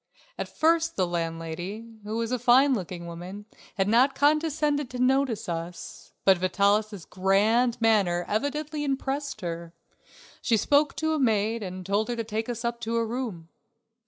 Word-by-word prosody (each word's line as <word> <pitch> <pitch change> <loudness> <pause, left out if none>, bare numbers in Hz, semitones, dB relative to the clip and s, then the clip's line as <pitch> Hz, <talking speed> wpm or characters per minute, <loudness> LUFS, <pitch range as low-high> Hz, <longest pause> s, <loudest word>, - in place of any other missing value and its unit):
At - - -5
first 330 +1 +2
the 185 - +2
landlady, 170 +4 -4 0.2
who 215 +2 -4
was 230 0 -2
a 250 - 0
fine 260 +3 +5
looking 180 -5 -4
woman, 180 +4 -8 0.3
had 195 0 +2
not 250 +6 +4
condescended 295 -2 +1
to 250 - -6
notice 255 -2 +1
us, 170 0 -6
but 190 -2 +5
Vitalis' 200 +1 +1
grand 215 +6 +2
manner 200 -6 +2
evidently 295 +6 -2
impressed 275 -2 -2
her. 170 -1 -5 0.7
She 230 - +2
spoke 290 +5 +2
to 315 0 0
a 310 - 0
maid 225 -2 +1
and 185 -2 -6
told 205 +3 0
her 240 - -1
to 230 - -2
take 220 +1 -3
us 235 0 -4
up 235 0 -2
to 230 +1 -2
a 230 - +1
room. 220 -9 -5
225 Hz, 160 wpm, -27 LUFS, 185-265 Hz, 0.7 s, fine